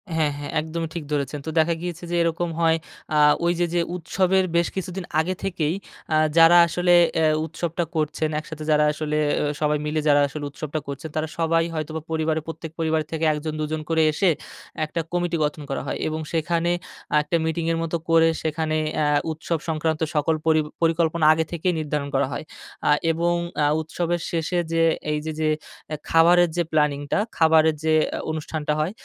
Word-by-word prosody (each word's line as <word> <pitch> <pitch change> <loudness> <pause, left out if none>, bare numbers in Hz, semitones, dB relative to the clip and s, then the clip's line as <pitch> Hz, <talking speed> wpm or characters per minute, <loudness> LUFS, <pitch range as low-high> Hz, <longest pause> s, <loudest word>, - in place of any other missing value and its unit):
হ্যাঁ, 155 -2 +2
হ্যাঁ, 145 - -6
একদমই 160 +1 -4
ঠিক 165 - -3
ধরেছেন। 145 0 -1
তো - - -3
দেখা 165 +2 +3
গিয়েছে 175 -1 -5
যে, 175 - 0
এরকম 170 +1 0
হয় 165 -1 +3 0.4
আ - - +4 0.3
ওই 170 - +3
যে, 175 - +3
যে 175 - +2
উৎসবের 185 +2 +1
বেশ 170 0 +3
কিছুদিন 190 -1 -4 0.2
আগে 185 +3 0
থেকেই, 170 -4 -1 0.4
আ - - +4 0.2
যারা 165 +1 +8
আসলে 175 +1 +2 0.3
এ - - +3 0.2
উৎসবটা 170 +2 -3
করছেন 155 0 0
একসাথে 155 0 -8
যারা 150 0 +4
আসলে 150 0 -2 0.2
এ - - 0 0.2
সবাই 150 0 +2
মিলে 155 +1 -1
যারা 145 0 +5
আসলে 145 +1 -6
উৎসবটা 155 +1 -4
করছেন, 140 +3 -6
তারা 155 0 -1
সবাই 165 0 +2
হয়তোবা 155 0 -4
পরিবারে 160 0 0
প্রত্যেক 160 -1 -7
পরিবার 160 -1 +1
থেকে 160 0 -1
একজন 150 +1 -4
দুজন 155 +1 -2
করে 160 -1 +3
এসে 180 +5 +2 0.6
একটা 160 +2 -4
কমিটি 175 -1 0
গঠন 150 0 -2
করা 135 - -2
হয় - - -2
এবং 155 0 -2
সেখানে 170 +1 +1 0.5
একটা 150 +3 -2
মিটিং 160 0 -1
এর - - -1
মতো 165 +1 -1
করে 165 0 +5 0.2
সেখানে 155 0 -1 0.3
আ - - +2 0.3
উৎসব 160 +1 -2
সংক্রান্ত 160 0 -1
সকল 155 +2 +2
পরি 160 -1 +4 0.2
পরিকল্পনা 165 -1 +2
আগে 160 0 0
থেকেই 175 +1 0
নির্ধারণ 150 -2 -2
করা - - +2
হয়। - - -4 0.4
আ - - +5 0.2
এবং 170 +1 +1 0.3
আ - - +4 0.2
উৎসবের 170 +2 -2
শেষে 170 +1 0
যে 165 0 +2 0.3
এইযে 150 +1 -2
যে 155 - +2 0.4
এ - - 0
খাবারের 170 +1 +5
যে 175 - +3
প্ল্যানিংটা, 145 +2 +1 0.2
খাবারের 160 -1 +5
যে 160 0 +2
আ - - -4
অনুষ্ঠানটা 155 -1 -3
হয়, 155 +5 0
160 Hz, 180 wpm, -23 LUFS, 155-170 Hz, 0.6 s, যারা